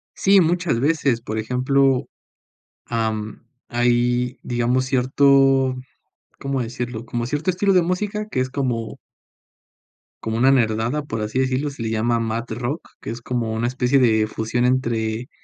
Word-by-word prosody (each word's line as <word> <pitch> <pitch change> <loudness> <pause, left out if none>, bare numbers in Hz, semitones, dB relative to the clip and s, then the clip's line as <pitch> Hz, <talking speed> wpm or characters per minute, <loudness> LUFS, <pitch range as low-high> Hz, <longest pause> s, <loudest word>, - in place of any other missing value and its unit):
Sí, 195 0 +5
muchas 170 -6 +1
veces, 140 -4 +1
por 110 -1 -5
ejemplo, 130 +3 +1 0.8
am, 110 -2 -3 0.2
hay, 120 +1 +1
digamos, 125 +1 0
cierto 135 0 +3 0.6
¿cómo 135 -1 -2
decirlo? 120 -1 -5
Como 120 0 -3
cierto 145 +7 -2
estilo 195 +2 +1
de 180 - +5
música 210 +4 -2
que 195 - -3
es 130 0 0
como 125 -5 -3 1.2
como 110 0 -2
una 130 +3 +5
nerdada, 120 +3 +1
por 115 -6 -4
así 110 +4 -2
decirlo, 130 +2 0
se 140 -3 -9
le 110 - -2
llama 115 +1 +1
mad 115 +1 -2
rock, 120 +7 -4
que - - -7
es 115 +1 -6
como 120 -2 -2
una 115 +2 -1
especie 130 +2 +2
de 110 -4 +3
fusión 115 +3 -1
entre 120 -1 0
125 Hz, 150 wpm, -22 LUFS, 115-135 Hz, 1.2 s, Sí